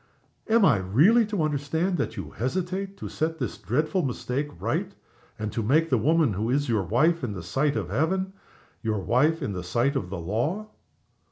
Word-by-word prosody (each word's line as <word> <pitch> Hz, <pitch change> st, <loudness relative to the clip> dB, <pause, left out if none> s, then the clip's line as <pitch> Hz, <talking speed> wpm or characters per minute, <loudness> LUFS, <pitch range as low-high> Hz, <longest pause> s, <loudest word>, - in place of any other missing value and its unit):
Am 225 Hz, -2 st, +5 dB
I 100 Hz, -, +5 dB
really 155 Hz, -, +4 dB
to 205 Hz, -6 st, -1 dB
understand 155 Hz, +5 st, 0 dB
that -, -, -2 dB
you -, -, -6 dB
hesitate 185 Hz, -, -3 dB
to -, -, -6 dB
set 160 Hz, +1 st, -2 dB
this 125 Hz, -8 st, -4 dB
dreadful 155 Hz, -, 0 dB
mistake 135 Hz, 0 st, -2 dB
right, -, -, -2 dB, 0.4 s
and 105 Hz, -1 st, -3 dB
to 115 Hz, -, -2 dB
make 155 Hz, +9 st, +2 dB
the 125 Hz, -, +4 dB
woman 155 Hz, -1 st, +3 dB
who 105 Hz, +5 st, -2 dB
is 145 Hz, +3 st, +1 dB
your 110 Hz, -4 st, +1 dB
wife 140 Hz, -, +2 dB
in 115 Hz, -4 st, -2 dB
the 95 Hz, -4 st, -6 dB
sight 135 Hz, -, 0 dB
of 100 Hz, -6 st, -2 dB
Heaven 185 Hz, -, 0 dB, 0.5 s
your 110 Hz, -1 st, -1 dB
wife 145 Hz, -, +2 dB
in 105 Hz, -, -2 dB
the 90 Hz, -, -4 dB
sight 120 Hz, +10 st, +1 dB
of 95 Hz, -9 st, -2 dB
the 95 Hz, -1 st, -4 dB
law?" 150 Hz, -, -2 dB
140 Hz, 190 wpm, -26 LUFS, 110-165 Hz, 0.5 s, Am